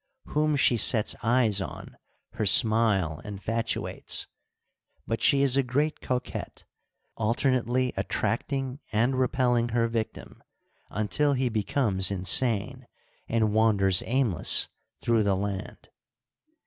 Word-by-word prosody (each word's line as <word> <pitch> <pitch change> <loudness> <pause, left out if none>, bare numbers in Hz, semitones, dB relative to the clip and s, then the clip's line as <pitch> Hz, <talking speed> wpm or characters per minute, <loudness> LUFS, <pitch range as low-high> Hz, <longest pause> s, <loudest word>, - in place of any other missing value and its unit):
Whom 150 0 +1
she 125 -3 +3
sets 110 -1 +2
eyes 115 -4 +2
on - - -8 0.4
her 110 - -3
smile 105 - +3
infatuates; 110 +3 -3 0.8
but 115 - -3
she 140 0 +4
is 135 -2 +4
a 140 - +4
great 140 +5 -1
coquette, 125 -1 -5 0.5
alternately 125 +2 0
attract - - -2
ing 135 -1 -3
and 120 +4 +1
repelling 125 -2 +1
her 115 0 +1
victim 115 -1 -5 0.5
until 125 +8 0
he 130 -1 0
becomes 105 -3 -1
insane 115 +6 +1 0.4
and 110 -2 0
wanders 100 -4 +3
aimless 120 - +2 0.3
through 115 -1 +2
the 100 -2 +1
land. 100 0 -5
115 Hz, 110 wpm, -26 LUFS, 105-130 Hz, 0.8 s, she